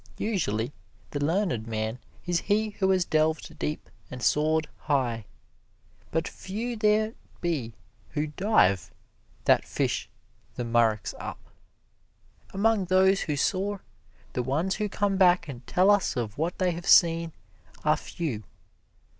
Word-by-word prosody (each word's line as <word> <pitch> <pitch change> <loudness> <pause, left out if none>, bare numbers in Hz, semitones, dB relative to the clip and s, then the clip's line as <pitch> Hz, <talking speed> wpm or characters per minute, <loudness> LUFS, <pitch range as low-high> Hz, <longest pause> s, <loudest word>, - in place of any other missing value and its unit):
Usually, 135 - -1 0.4
the 145 -1 -2
learned 165 - 0
man 110 +2 -2 0.3
is 175 -1 +1
he 215 +3 +1
who 195 -2 0
has 185 -2 +3
delved 155 -1 0
deep 150 - -3 0.2
and 125 -1 -7
soared 155 +1 +2
high. 125 -7 -1 0.8
But 160 0 -1
few 230 +5 -5
there 215 0 +2 0.3
be 140 -10 -2 0.3
who 150 0 -1
dive, 145 - +2 0.6
that - - +5
fish - - -2 0.5
the 120 - -3
murex 115 -3 +2
up. - - -5 1.1
Among 205 0 +2
those 190 +1 +4
who 150 - -1
soar, 195 +7 -1 0.5
the 125 - 0
ones 150 +10 0
who 210 -1 -1
come 200 0 0
back 180 -2 +4
and 125 -4 -9
tell 185 +3 +4
us 205 -6 +2
of 115 -3 -2
what 165 +4 -2
they 185 -1 +2
have 175 +1 -6
seen, 165 -1 +5 0.5
are 155 0 +5
few. 150 -7 -4
165 Hz, 135 wpm, -27 LUFS, 130-195 Hz, 1.1 s, that